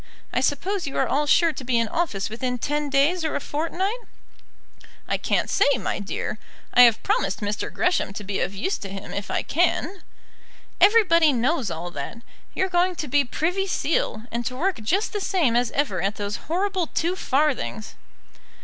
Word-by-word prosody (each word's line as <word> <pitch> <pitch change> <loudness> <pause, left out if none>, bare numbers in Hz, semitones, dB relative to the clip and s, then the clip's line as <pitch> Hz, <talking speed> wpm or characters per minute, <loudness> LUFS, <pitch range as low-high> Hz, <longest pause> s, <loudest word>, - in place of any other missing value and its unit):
I - - +2
suppose 350 +7 -1
you 275 - -4
are - - +2
all 295 +2 +1
sure 330 +2 +4
to 270 - -7
be 245 -1 +1
in 230 -1 +2
office 215 - -1
within 250 +3 -3
ten 295 +3 -2
days 290 +6 +2
or 315 - -1
a - - 0
fortnight?" 345 - -2 1.1
"I - - 0
can't - - 0
say, - - +3
my 195 - -2
dear. 205 +1 -4 0.3
I 245 - +7
have 230 -2 +3
promised 195 -1 0
Mr. 205 0 -3
Gresham 355 - 0
to 205 - -6
be 195 0 -3
of - - -1
use 380 - -2
to 195 - -7
him 195 +1 -7
if 200 0 -4
I - - -1
can." 355 +3 0 0.8
"Everybody 365 -7 +6
knows 255 - 0
all 170 +1 -5
that. 175 +11 -7 0.3
You're 380 - +1
going 360 0 +1
to 305 - -4
be 285 +2 +3
Privy 360 +9 -1
Seal, 300 - -1
and 235 +1 -2
to 255 - -4
work 370 +6 0
just 380 - 0
the 415 - -2
same 330 - +1
as 240 -1 +2
ever 250 -11 -1
at 200 +3 -1
those 205 -1 -3
horrible 370 0 0
two 345 +3 -1
farthings." 275 - -1
285 Hz, 185 wpm, -24 LUFS, 220-350 Hz, 1.1 s, I